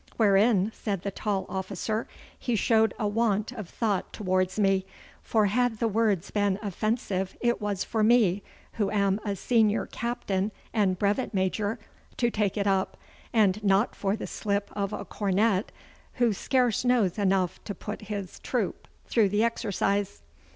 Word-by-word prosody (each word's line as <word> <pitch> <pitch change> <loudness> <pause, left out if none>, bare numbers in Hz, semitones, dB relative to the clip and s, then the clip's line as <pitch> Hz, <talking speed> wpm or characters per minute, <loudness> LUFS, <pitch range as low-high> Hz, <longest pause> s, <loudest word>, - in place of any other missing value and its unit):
'Wherein,' 205 -1 +4
said 200 -4 -3
the 200 - -2
tall 195 -1 -2
officer, 195 +3 -3 0.3
'he 245 - -1
showed 220 0 +3
a 215 - 0
want 215 0 +1
of 215 -8 -7
thought 210 -5 -1
towards 185 -2 0
me, 195 -2 +3 0.4
for 220 -2 +2
had 235 +2 +1
the 230 - +1
words 210 -4 +1
been 205 -2 +1
offensive 200 -2 -2
it 240 -2 +1
was 205 -2 -1
for 220 - -1
me, 215 -4 +4 0.3
who 205 -3 0
am 200 -1 +1
a 205 -2 -2
senior 220 +1 +2
captain 215 -4 -2 0.2
and 200 -5 +2
brevet 205 +4 0
major, 205 +3 0 0.4
to 240 -1 +2
take 210 -2 0
it 200 - 0
up, 195 -1 +1 0.3
and 210 -2 +3
not 195 +2 +3
for 195 -1 0
a 220 - -4
slip 200 -1 -2
of 200 -1 -2
a 205 -1 -5
cornet, 200 +1 +1 0.4
who 240 -3 +2
scarce 245 +2 +1
knows 235 -7 +2
enough 190 -3 +1
to 205 - -5
put 210 - -6
his 200 -3 -5
troop - - -2 0.2
through 220 -4 +3
the 205 +3 +2
exercise. 200 -3 -1
205 Hz, 160 wpm, -27 LUFS, 195-225 Hz, 0.4 s, Wherein